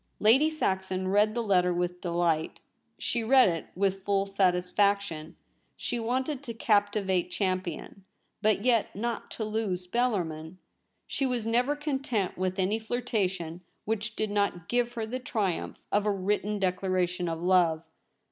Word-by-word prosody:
Lady 265 +9 +5
Saxon 190 -10 -1
read 210 +2 +3
the 235 - 0
letter 180 -4 +3
with 180 0 -2
delight; 170 -2 0 0.4
she 235 -1 -1
read 255 +2 +6
it 165 -3 -2
with 195 +1 0
full 200 -1 +1
satisfaction. 185 -3 +1 0.4
She 240 - -2
wanted 255 +4 -1
to 235 -5 -7
captivate 205 -4 +1
Champion, 185 0 -3 0.4
but 215 +1 +2
yet 235 -4 +2
not 230 +2 -3
to 220 - -4
lose 210 -4 -2
Bellar 235 0 +1
min. 160 +2 -8 0.5
She 270 - -1
was 245 -3 -1
never 245 +5 +2
content 265 - -1
with 185 +1 -2
any 195 +4 +1
flirtation 195 -8 -2 0.2
which 225 +1 -2
did 215 -1 -2
not 200 -4 0
give 240 0 0
her 225 -2 -3
the 250 +4 -4
triumph 210 -8 -2
of 205 +1 +2
a - - +3
written 205 +2 -1
declaration 185 -2 0
of 165 0 -3
love. 175 -3 +3
200 Hz, 145 wpm, -28 LUFS, 180-225 Hz, 0.5 s, read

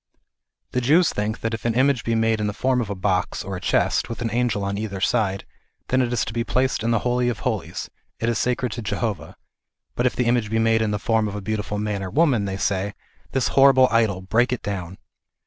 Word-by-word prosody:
The 125 - 0
Jews 160 +8 +4
think 105 +2 -2
that 115 0 -2
if 115 - -4
an 115 -1 0
image 130 -1 +2
be 115 - 0
made 115 0 +2
in 105 - 0
the 105 - -2
form 130 +1 +1
of 110 - -4
a 100 - -3
box, 90 -1 -1
or 95 0 -5
a 90 - -6
chest, - - +1
with 115 +1 -5
an 115 - -2
angel 115 -3 0
on 100 0 -2
either 100 -2 -4
side, 100 -2 0 0.4
then 130 +1 +3
it 120 -1 0
is 115 -2 0
to 110 - -6
be 115 0 -1
placed 130 +1 0
in 115 - 0
the 115 - +3
Holy 125 0 +2
of 110 -5 -4
Holies; - - -3 0.3
it 115 - -1
is 120 -2 +1
sacred 125 -1 0
to 115 - -5
Jehovah; 105 -6 -3 0.6
but 120 - +1
if - - -2
the 125 - 0
image 120 -3 +1
be 110 - 0
made 115 0 +3
in 110 - +1
the 105 - 0
form 110 0 +1
of 105 - -5
a - - -3
beautiful 105 0 -3
man 105 -1 -2
or 95 - -4
woman, 135 - +2
they 95 -1 -3
say 100 0 -1 0.2
" - - -34
This 135 -1 +1
horri 135 0 +6
ble 130 0 +6
idol; 110 -5 +2
break 115 +6 +2
it 125 - -3
down 95 -2 -4
115 Hz, 250 wpm, -23 LUFS, 105-125 Hz, 0.6 s, horri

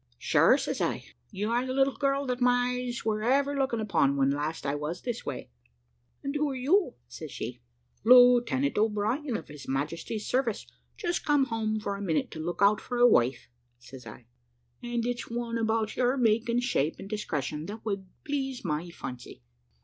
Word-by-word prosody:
"`Sure,' - - +4
says - - -3
I, - - -1 0.3
`you 205 +3 -2
are 240 +1 +2
the 260 0 -3
little 270 0 +2
girl 275 0 0
that 250 -1 -2
my 245 0 +3
eyes 250 -2 -4
were 215 -1 0
ever 275 +5 +2
looking 265 -4 0
upon 185 -10 +2
when 135 0 +3
last 150 +3 -3
I 140 - 0
was 150 +4 -4
this 240 -2 -4
way.' - - -5 0.7
"`And 280 +1 -2
who 295 0 +1
are 270 - -4
you?' 280 +3 +2
says 155 - -8
she. 120 +1 -6 0.4
"`Lieutenant 250 +2 +5
O'Brien, 220 +5 0
of - - -10
His 145 -1 -11
Majesty's 165 +10 -3
service, 250 -4 0 0.3
just 345 0 -2
come 290 -3 +3
home 220 -2 -1
for 200 -1 -3
a - - -7
minute 165 -6 -1
to 160 - -7
look 175 +3 -1
out 205 +1 +4
for 245 - -4
a 240 - +6
wife,' 125 - +2 0.3
says 120 0 -12
I; 115 +3 -11 0.6
`and 240 -1 -2
it's 245 0 -3
one 235 0 -3
about 220 -1 0
your 250 +2 +2
make, 230 -1 +2
and 240 +1 +1
shape, 160 - 0
and - - -9
discretion, 155 - -3
that 215 +2 -8
would 195 -3 -3 0.2
please 270 -4 -3
my 160 +1 -2
fancy.' 125 - -9
225 Hz, 190 wpm, -28 LUFS, 165-250 Hz, 0.7 s, a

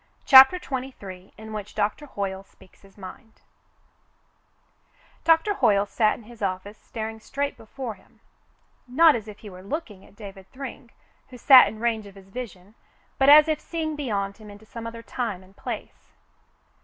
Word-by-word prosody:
CHAPTER 265 +6 +9
XXIII 250 - -7
IN 220 +1 -10
WHICH 210 -1 -7
DOCTOR 210 +8 -2
HOYLE 195 -5 -4
SPEAKS 190 -1 -23
HIS 195 0 -21
MIND 205 +3 -12 1.8
Doctor 330 +5 +3
Hoyle 205 - +2
sat 215 +1 +1
in - - -15
his 235 0 -15
office 195 +2 -4
staring 220 -1 -7
straight 280 +5 -3
before 235 +1 -7
him, 190 - -24 0.7
not 310 +5 +5
as 220 -2 -5
if 210 -1 -10
he 210 - -11
were 185 0 -12
looking 210 - -6
at - - -20
David 195 -3 -12
Thryng, 255 -2 -9 0.4
who 250 - -11
sat 260 +1 +8
in 220 - -7
range 225 -2 -1
of 200 - -15
his 195 -1 -16
vision, 200 -4 -9 0.5
but 270 +1 +5
as 300 +1 +9
if 310 -1 0
seeing 320 -2 -4
beyond 200 -8 -3
him 215 -1 -13
into 205 +1 -14
some 230 +1 -8
other 230 0 -9
time 225 -8 -4
and 190 +1 -21
place. - - -8
220 Hz, 170 wpm, -25 LUFS, 200-265 Hz, 1.8 s, CHAPTER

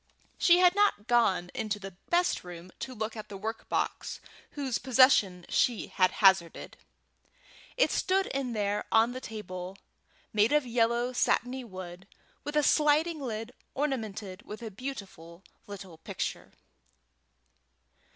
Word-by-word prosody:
She 350 -1 +6
had 360 0 +6
not 405 - +2
gone 210 -7 +2
into 215 -1 -2
the 195 -2 -9
best 350 +1 +2
room 175 0 -10
to 255 - -6
look 220 +1 -4
at 215 - -8
the 200 - -7
work 220 +3 -5
box - - -2 0.3
whose 270 -4 -2
possession 235 -9 +4
she 240 -3 +1
had 185 -1 +3
hazarded. 190 -4 +2 1.0
It - - +3
stood 385 +1 +1
in 270 -6 -3
there 205 -1 -1
on 225 +2 +4
the 255 +1 -6
table, 185 -5 -7 0.6
made 215 +5 +3
of 300 -2 +3
yellow 240 +1 +1
satiny 250 +1 +1
wood, 185 -3 -9 0.4
with 295 - -5
a 300 - +4
sliding 305 +3 +3
lid 225 -2 -5 0.2
ornamented 220 -9 -3
with 215 +3 -9
a 220 - -6
beautiful 195 -8 -8 0.2
little 190 -5 -9
picture. - - -5
225 Hz, 135 wpm, -29 LUFS, 195-265 Hz, 1.0 s, She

